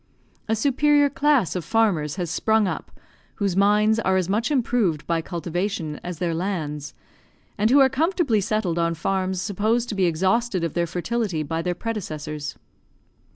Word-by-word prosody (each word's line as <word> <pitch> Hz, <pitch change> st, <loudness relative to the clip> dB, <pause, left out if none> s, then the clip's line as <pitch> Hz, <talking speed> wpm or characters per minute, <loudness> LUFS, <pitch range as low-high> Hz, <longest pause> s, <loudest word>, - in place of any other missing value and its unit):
A 220 Hz, -, +3 dB
superior 285 Hz, +4 st, +3 dB
class 280 Hz, -, +2 dB
of 180 Hz, -, -2 dB
farmers 175 Hz, -7 st, +1 dB
has 175 Hz, -4 st, -3 dB
sprung 220 Hz, +3 st, +2 dB
up, -, -, -5 dB, 0.4 s
whose 200 Hz, -3 st, -1 dB
minds 210 Hz, +3 st, +3 dB
are 190 Hz, -4 st, +2 dB
as 185 Hz, -2 st, 0 dB
much 215 Hz, +5 st, 0 dB
improved 235 Hz, -, +1 dB
by 165 Hz, -1 st, 0 dB
cultivation 170 Hz, -1 st, -3 dB
as 175 Hz, -2 st, -5 dB
their 170 Hz, 0 st, -1 dB
lands, 155 Hz, -5 st, -3 dB, 0.6 s
and 215 Hz, +2 st, +2 dB
who 275 Hz, +3 st, +6 dB
are 270 Hz, -, +7 dB
comfortably 285 Hz, -, +1 dB
settled 190 Hz, -4 st, -1 dB
on 170 Hz, 0 st, +1 dB
farms 190 Hz, +2 st, -1 dB
supposed 220 Hz, +4 st, 0 dB
to -, -, -2 dB
be 190 Hz, -2 st, +2 dB
exhausted 190 Hz, +4 st, +1 dB
of 165 Hz, -, -2 dB
their 170 Hz, -1 st, 0 dB
fertility 180 Hz, -1 st, -2 dB
by 160 Hz, +2 st, -2 dB
their 175 Hz, +1 st, -2 dB
predecessors. 155 Hz, -, -5 dB
190 Hz, 160 wpm, -23 LUFS, 170-225 Hz, 0.6 s, are